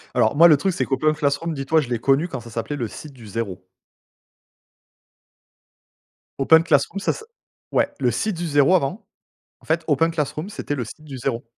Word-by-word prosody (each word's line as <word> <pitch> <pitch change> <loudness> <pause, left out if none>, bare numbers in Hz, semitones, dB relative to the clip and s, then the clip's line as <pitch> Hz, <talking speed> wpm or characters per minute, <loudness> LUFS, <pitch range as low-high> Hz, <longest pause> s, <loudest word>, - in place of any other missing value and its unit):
Alors, 110 - +3
moi, 165 +3 +8
le 155 -3 +6
truc, 190 +6 0
c'est 185 - -1
qu'OpenClassroom, 150 +3 0
dis-toi, 150 +3 +1
je 130 - -6
l'ai 120 - -1
connu 140 +7 +2
quand 135 -7 -6
ça 115 - -12
s'appelait 115 +6 -4
le 120 -5 -3
Site 150 +6 -10
du 120 -4 -13
Zéro. 100 -3 -4 2.8
OpenClassroom, 160 +4 +4
ça - - 0
s - - -8 0.5
ouais, - - +1
le - - +2
Site 215 -5 -2
du 175 0 -3
Zéro 145 +3 +4
avant. 185 +6 -1 0.6
En - - -22
fait, 160 +1 +1
OpenClassroom, 160 +3 0
c'était 145 - -4
Le 125 - -2
Site 115 - -12
du 140 -3 -8
Zéro. 115 -1 -2
145 Hz, 175 wpm, -22 LUFS, 130-165 Hz, 2.8 s, moi